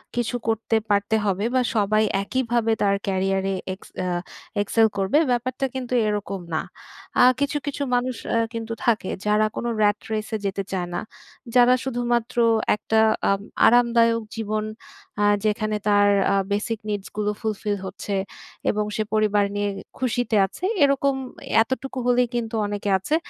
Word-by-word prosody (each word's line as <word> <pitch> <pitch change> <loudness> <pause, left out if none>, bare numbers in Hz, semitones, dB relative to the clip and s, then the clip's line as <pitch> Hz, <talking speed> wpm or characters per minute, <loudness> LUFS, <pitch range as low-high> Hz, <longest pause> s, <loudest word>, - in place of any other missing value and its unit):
কিছু 240 0 -1
করতে 225 0 0
পারতে 205 +1 +2
হবে 200 +1 0
বা, 255 - +4
সবাই 215 0 +3 0.2
একইভাবে 235 -1 0
তার 200 -1 +3
ক্যারিয়ারে 195 0 0 0.2
এক্স 190 - -13 0.2
আ - - -1 0.5
excel 220 +2 +3
করবে, 195 +9 +2
ব্যাপারটা 255 +2 -1
কিন্তু 255 -1 -4
এরকম 205 -2 -2
না। 155 - +1 0.6
আ - - +8 0.2
কিছু, 285 +1 0
কিছু 285 0 -2
মানুষ 250 +1 0 0.2
অ্যা 230 - +3
কিন্তু 230 0 -4
থাকে 220 -5 +1 0.2
যারা 210 +1 +3
কোন - - -4 0.2
rat 205 0 +3
race 215 +1 -3
এ - - +1
যেতে 195 0 -1
চায় 180 -2 -2
না। - - -1 0.6
যারা 245 0 +7
শুধুমাত্র 240 -2 -1 0.4
একটা 220 +1 0 0.3
আম 195 0 +1 0.3
আরামদায়ক 230 -1 +4
জীবন 215 -1 -2 0.6
আ - - +3 0.2
যেখানে 215 0 0
তার 205 0 +5 0.3
আ - - +3 0.2
বেসিক 210 +2 -1
নিডসগুলো 210 +1 -2
ফুলফিল 210 -1 -1
হচ্ছে 190 +2 -5 0.6
এবং 210 0 0
সে 215 - 0
পরিবার 210 -1 +3
নিয়ে 205 0 0
এ 195 - -7 0.2
খুশিতে 245 -3 0
আছে, 195 - -11 0.2
এরকম, 275 0 +3 0.5
এতটুকু 260 +2 -5
হলেই 245 0 +3
কিন্তু 230 -1 -2
অনেকে 205 0 -3
আছে 245 +11 -1
220 Hz, 150 wpm, -23 LUFS, 205-240 Hz, 0.6 s, আ